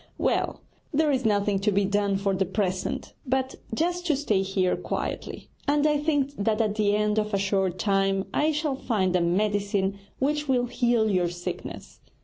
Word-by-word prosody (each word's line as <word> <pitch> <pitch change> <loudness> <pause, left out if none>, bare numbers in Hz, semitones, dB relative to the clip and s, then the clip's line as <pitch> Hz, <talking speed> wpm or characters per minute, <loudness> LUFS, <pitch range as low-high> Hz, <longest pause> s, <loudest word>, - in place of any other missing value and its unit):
Well, - - 0 0.3
there 305 0 +2
is 260 -3 0
nothing 205 -2 +2
to 205 +2 +1
be 200 0 +2
done 200 0 +1
for 195 0 0
the 190 0 +1
present, 190 -1 -2
but 265 0 -1 0.2
just 345 +9 0
to 305 - +3
stay 220 -9 +1
here 190 -1 +1
quietly, - - -4 0.2
and 290 +1 +3
I 300 -1 +3
think 290 -2 +1
that 215 +1 +1
at 215 -2 +2
the 210 -1 +2
end 210 0 +2
of 210 -1 -1
a - - +3
short 195 -2 0
time 195 -1 +1
I 305 +1 +2
shall 300 -2 -1
find 190 -8 0
a 180 - +3
medicine 200 +2 0 0.2
which 295 +2 0
will 250 -2 +3
heal 240 -2 +2
your 180 -2 +2
sickness.' 175 0 -7
210 Hz, 180 wpm, -26 LUFS, 195-265 Hz, 0.3 s, to